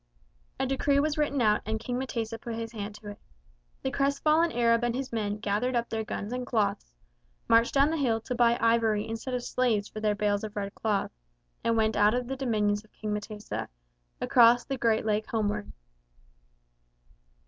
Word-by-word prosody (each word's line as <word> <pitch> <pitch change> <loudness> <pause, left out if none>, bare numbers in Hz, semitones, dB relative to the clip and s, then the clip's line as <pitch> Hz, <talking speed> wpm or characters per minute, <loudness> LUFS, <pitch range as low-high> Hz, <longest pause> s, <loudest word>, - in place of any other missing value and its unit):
A - - +1
decree 275 +1 +2
was 300 +1 +1
written 285 -3 0
out 210 -1 +3
and 220 0 -2
King 245 +2 -3
M'tesa 230 -3 -3
put 235 -1 -5
his 225 0 -5
hand 210 -2 -6
to 210 -1 -10
it. 205 - -9 0.6
The 265 - -1
crestfallen 305 +4 +2
Arab 230 0 +2
and 240 0 0
his 265 0 -4
men 210 -2 -1
gathered 215 +5 -1
up 235 0 0
their 220 -1 -2
guns 210 +1 -5
and 250 0 -2
cloths, 210 - -1 0.6
marched 230 +3 +4
down 280 +3 +4
the 325 - -1
hill 240 -6 +1
to 250 - -4
buy 240 -1 +3
ivory 230 -2 +2
instead 225 +3 -4
of 245 - -3
slaves 225 -6 0
for 215 - -8
their 210 -1 +1
bales 205 0 0
of 215 -1 -6
red 200 0 -3
cloth, 210 -3 -1 0.5
and 230 0 +1
went 220 -1 +2
out 210 +2 +4
of 250 0 -1
the 265 +2 -4
dominions 210 -5 0
of 215 - -24
King 215 -1 -4
M'tesa, 210 0 -5 0.5
across 240 0 +5
the 275 - -2
Great 230 -3 +1
Lake 215 0 0
homeward. 205 - -1
225 Hz, 190 wpm, -28 LUFS, 210-250 Hz, 0.6 s, across